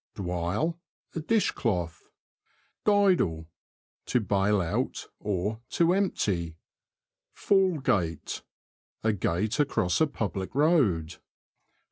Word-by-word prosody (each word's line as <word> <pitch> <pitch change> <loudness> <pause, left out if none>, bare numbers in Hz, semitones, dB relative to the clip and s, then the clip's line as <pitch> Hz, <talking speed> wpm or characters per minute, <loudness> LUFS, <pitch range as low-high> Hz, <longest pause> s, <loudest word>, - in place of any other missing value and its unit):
DwYLE. 95 - -2 0.2
— - - -34
A - - -1
dishcloth. 115 - -1 0.8
Dydle. 185 - +3 0.3
— - - -67
To 125 - +2
bail 100 0 +2
out, 85 -3 -2 0.6
to 170 +1 +3
empty. 95 - 0 0.8
Fall 190 -4 +3
Gate. 85 - -1 0.3
— - - -49
A 110 0 +2
gate 105 - -1
across 140 - +1
a 160 - +5
public 100 - -4
road. 135 - +2
105 Hz, 100 wpm, -28 LUFS, -, 0.8 s, a